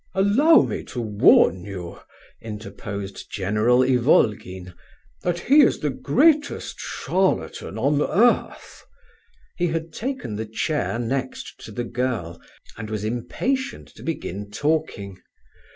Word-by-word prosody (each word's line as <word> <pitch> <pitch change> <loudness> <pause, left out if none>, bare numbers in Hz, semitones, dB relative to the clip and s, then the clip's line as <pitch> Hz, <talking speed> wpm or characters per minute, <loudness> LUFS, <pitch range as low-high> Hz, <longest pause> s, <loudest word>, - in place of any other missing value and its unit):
"Allow 235 +12 +5
me - - -4
to 125 - -6
warn 105 -4 +4
you," 90 -3 -7 0.4
interposed 105 -2 -7
General 105 +6 +2
Ivolgin, 105 - +1 0.5
"that 175 -1 -1
he 285 +5 +6
is 270 - +4
the 150 - -2
greatest 290 - +1
charlatan 185 - -1
on 140 +5 +1
earth." 235 +10 +1 0.7
He 175 - +1
had 165 0 -3
taken 255 - -4
the 110 0 -4
chair 115 +3 -1
next 130 +2 -4
to - - -9
the 120 +3 -3
girl, 120 -8 -3 0.3
and 110 -1 -7
was 105 -2 -3
impatient 260 - -2
to - - -16
begin 100 - -5
talking. 105 -7 -2
125 Hz, 120 wpm, -23 LUFS, 105-175 Hz, 0.7 s, he